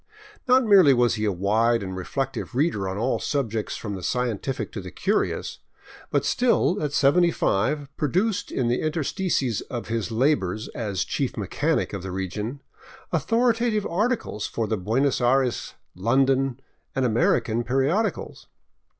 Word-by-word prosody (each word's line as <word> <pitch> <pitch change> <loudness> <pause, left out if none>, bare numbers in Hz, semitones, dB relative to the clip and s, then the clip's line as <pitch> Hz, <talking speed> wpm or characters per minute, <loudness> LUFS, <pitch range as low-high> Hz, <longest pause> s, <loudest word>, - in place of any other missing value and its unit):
Not 255 +1 +5
merely 190 - +6
was 120 -1 +3
he 110 -1 -1
a 105 - +2
wide 110 +5 +1
and 95 -1 -5
reflective 130 +7 -4
reader 125 - +1
on 95 - -4
all 120 +5 0
subjects 115 -7 -2
from 105 -2 -5
the 95 - -6
scientific 125 +1 -2
to 100 - -5
the 95 - -8
curious, 200 - -1 0.5
but - - 0
still, 235 -5 +2
at 150 -2 -1
seventy 155 +5 +4
five, 145 +2 0
produced 185 - 0
in 125 - 0
the 120 +1 +1
in 155 - 0
terstices 150 - -1
of 120 -2 -5
his 115 -1 -2
labors 110 -5 0
as 100 -7 -2
chief - - -2
mechanic - - -1
of 100 - -4
the 95 0 -6
region 105 +8 -4 0.5
authoritative 225 - +1
articles 200 - -1
for 115 - -2
the 110 +1 -1
Buenos 120 +8 0
Aires, 125 0 +1 0.2
London, 130 +5 +1 0.4
and 135 -1 +1
American 115 0 +1
periodicals. 135 - -1
125 Hz, 150 wpm, -24 LUFS, 110-155 Hz, 0.5 s, merely